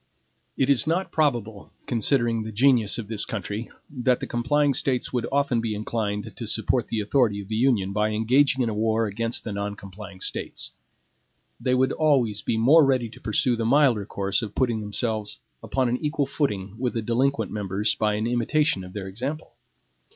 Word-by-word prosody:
It 135 - +2
is 140 -2 +4
not 175 +4 0
probable, 120 -9 -1
considering 120 -1 +1
the 110 0 -5
genius 120 -1 +3
of 115 -4 -5
this 110 -1 -2
country, 105 +2 -4 0.2
that 125 -3 0
the - - -4
complying 140 +4 +1
States 130 -1 -1
would 125 -2 -1
often 140 -4 +1
be 110 -2 -2
inclined 105 0 -3
to 115 - -5
support 115 +2 0
the 115 - -2
authority 105 -1 +2
of 100 0 -9
the 110 - -2
Union 110 -5 +2
by 105 +1 +1
engaging 125 +5 +2
in 115 - 0
a - - -2
war 110 +1 +1
against 115 +3 -1
the 110 - -5
non 100 0 -3
complying 100 0 -11
States. - - -3 0.9
They 125 - +1
would 130 +1 +2
always 130 -9 +2
be 110 - -1
more 145 +8 +6
ready 130 -4 +1
to - - -15
pursue 120 +3 +1
the 115 - -2
milder 120 -4 +3
course 100 0 0
of 105 -3 -6
putting 120 -4 +1
themselves 105 0 -3 0.2
upon 130 -2 0
an 120 +1 0
equal 150 0 -1
footing 105 -8 -2
with 125 -1 -1
the 115 - -1
delinquent 130 +5 0
members 105 +1 0
by 105 -1 0
an 105 +1 -1
imitation 120 - +1
of 90 0 -10
their 100 -2 -5
example. 130 +11 -5
115 Hz, 190 wpm, -25 LUFS, 105-130 Hz, 0.9 s, more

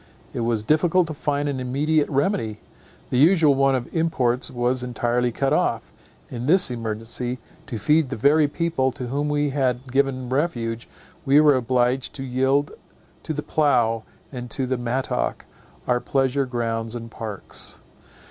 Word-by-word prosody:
It - - -4
was 115 -2 0
difficult 165 +7 +3
to 160 - -6
find 145 0 -1
an 140 -2 -2
immediate 145 +4 +1
remedy. 135 - 0 0.5
The 125 - +2
usual 160 -1 +5
one 135 0 +3
of 125 -2 -3
imports 130 -7 0
was 125 +1 0
entirely 120 0 0
cut 135 +4 0
off. - - 0 0.4
In 120 0 -4
this 180 -3 +5
emergency, 115 +2 -3 0.3
to 125 -5 -4
feed 150 +6 +2
the 135 - -3
very 145 +6 +4
people 150 -4 0
to 125 -4 -6
whom 145 +3 -1
we 145 -1 0
had 130 -2 -1
given 135 -1 0
refuge, 120 -5 -2 0.3
we 140 +1 +5
were 150 -2 +6
obliged 125 +1 0
to 135 - -5
yield 135 +3 +1 0.5
to - - -5
the 150 -1 -3
plough 120 -7 +2 0.3
and 125 -2 -7
the 130 +2 -1
mattock 125 +2 -2 0.4
our 125 -1 +2
pleasure 135 +1 0
grounds 115 -2 -2
and 115 -1 -7
parks. 110 -4 -6
130 Hz, 155 wpm, -23 LUFS, 120-145 Hz, 0.5 s, were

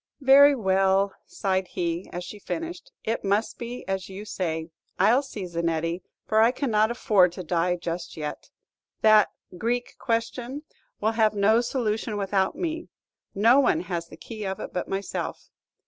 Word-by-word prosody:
"Very 280 +1 +7
well," 195 -2 +2
sighed 190 -1 -1
he, 170 +1 -3
as 175 +1 -5
she 210 - -9
finished, 335 - -5
"it 225 +1 -2
must 200 +3 0
be 240 +1 -6
as 190 -1 -3
you 195 +2 -8
say. 165 -5 -3 0.3
I'll 245 +5 +5
see 225 -9 -7
Zanetti, 170 0 -1 0.2
for 220 0 +3
I 225 - +6
cannot 225 -5 +1
afford 200 -7 +3
to 185 - -6
die 175 +1 +1
just 170 -1 -5
yet. 150 -1 -5 0.5
That 215 -1 +6 0.3
'Greek 245 +2 -2
question' 245 +4 -2 0.4
will 215 +2 +1
have 220 -2 +2
no 215 +3 +4
solution 225 -3 -1
without 195 -1 0
me, 330 -1 -3 0.5
no 230 +7 +6
one 205 - +3
has 175 -2 -4
the 155 - -13
key 215 +4 -8
of 190 -1 -3
it - - -7
but 180 - -2
myself. 195 +1 -4
205 Hz, 160 wpm, -26 LUFS, 180-235 Hz, 0.5 s, Very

